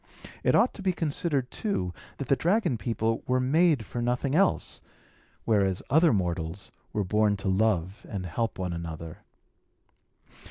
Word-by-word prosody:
It - - +3
ought 240 - +4
to - - -9
be 190 -1 +1
considered, 150 -5 -1
too, 95 - -2 0.2
that 140 - -5
the 135 - +4
dragon 180 - +1
people 115 +1 -1
were 130 0 +2
made 145 -1 +3
for 120 - -4
nothing 125 +3 0
else; 190 +4 +1 0.6
whereas 100 -4 +2
other 160 +2 +5
mortals 85 -1 -2 0.2
were 105 - 0
born 105 +2 +2
to 100 - -5
love 95 +1 +1
and 95 -3 -4
help 115 +7 -2
one 90 -2 -2
another. 80 -1 -6
110 Hz, 150 wpm, -28 LUFS, 95-140 Hz, 0.6 s, other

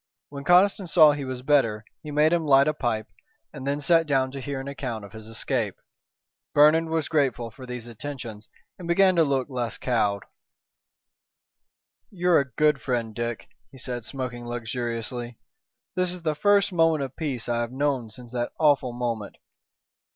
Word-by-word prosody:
When 140 -1 -8
Conniston 185 +4 +4
saw 155 -3 +7
he 145 -1 -4
was 130 -1 -5
better 115 -7 +2 0.2
he 150 - -9
made 150 +2 +3
him 170 -1 +2
light 140 -2 +5
a 155 - +2
pipe 120 -6 -2 0.5
and 135 -3 -7
then 140 +1 0
sat 165 +2 +3
down 135 -2 +1
to 135 0 -6
hear 140 0 -4
an 135 - -7
account 125 -6 -5
of 100 - -13
his 110 -1 -10
escape. 115 -2 -2 0.8
Bernard 155 +3 +6
was 160 -2 -1
grateful 130 -7 0
for 130 +2 -12
these 125 -2 -6
attentions 120 -3 -8 0.3
and 175 - -7
began 185 +2 +4
to 165 - +5
look 135 -3 0
less 125 -4 -3
cowed. 105 -5 0 1.9
"You're 180 -3 +3
a 140 -2 -3
good 150 +2 +2
friend, 120 -4 -2
Dick," 120 0 -4 0.2
he 135 - -14
said, 125 -2 -4
smoking 120 -1 -5
luxuriously. 120 0 -4 0.6
"This 185 -1 +1
is 180 -2 -5
the 155 -2 +1
first 200 +4 +3
moment 165 -3 +3
of 135 -1 -7
peace 140 -7 -3
I 120 -1 0
have 120 0 -3
known 135 -3 -1
since 120 +2 -10
that 120 -1 -3
awful 140 -5 +3
moment." 120 -4 -3
135 Hz, 175 wpm, -25 LUFS, 120-150 Hz, 1.9 s, saw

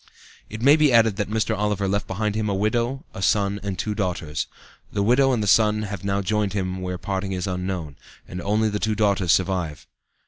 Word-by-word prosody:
It 110 +2 -6
may 140 +3 +7
be 150 -3 +4
added 115 -4 +4
that 105 -2 -2
Mr. 110 +1 0
Oliver 105 -1 0
left 100 +2 -1
behind 105 +2 -1
him 110 0 -1
a 100 - 0
widow, 120 - -1
a - - -7
son 100 +1 +1
and 100 -2 -4
two 105 +3 -2
daughters. 90 -7 -2 0.4
The 100 - 0
widow 130 +5 +4
and 115 -4 0
the - - -2
son 105 +1 +4
have 100 -2 -6
now 100 0 0
joined 105 0 0
him 95 -2 -2
where 90 0 -3
parting 95 0 -3
is 90 -1 -2
unknown, 90 -5 -4 0.3
and 90 - -6
only 105 +4 +1
the 105 0 -2
two 110 0 0
daughters 100 -5 +2
survive. 90 -5 0
100 Hz, 210 wpm, -23 LUFS, 95-110 Hz, 0.4 s, may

